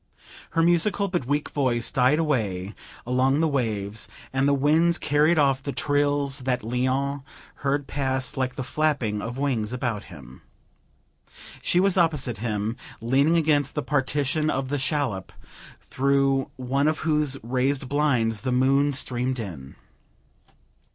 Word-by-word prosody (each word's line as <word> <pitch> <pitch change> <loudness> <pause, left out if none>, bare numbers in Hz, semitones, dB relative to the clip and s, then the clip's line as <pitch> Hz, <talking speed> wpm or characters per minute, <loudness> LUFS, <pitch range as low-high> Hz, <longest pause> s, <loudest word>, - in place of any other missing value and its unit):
Her 165 - +5
musical 175 +4 +2
but 175 -9 -2
weak 145 +1 0
voice 125 -5 0
died 130 +2 +3
away 110 - -1 0.3
along 130 +3 +2
the 160 - +3
waves, 110 -7 -2 0.3
and 135 +1 +2
the 140 - +3
winds 160 +5 +3
carried 150 +4 +2
off 135 -3 +3
the 140 - -4
trills 145 -1 0
that 125 -1 -1
Léon 130 +4 -1 0.4
heard 140 0 -1
pass 130 -2 -2
like 130 -2 -2
the 130 - -4
flapping 130 -8 0
of 120 +4 -5
wings 125 -6 -1
about 120 -5 -3
him. 65 -8 -13 1.2
She 175 - +2
was 195 0 +3
opposite 150 - +1
him, 110 0 -2 0.2
leaning 140 +8 +2
against 145 -3 +1
the 150 - -1
partition 145 +2 0
of 135 -2 -2
the 145 0 -1
shallop, 130 -8 -1 0.5
through 135 0 +1
one 135 +3 0
of 155 0 +1
whose 150 -3 +1
raised 130 +3 0
blinds 125 -7 +1
the 130 - -2
moon 135 +3 +3
streamed 130 -1 -1
in. 85 - -7
135 Hz, 140 wpm, -25 LUFS, 125-145 Hz, 1.2 s, Her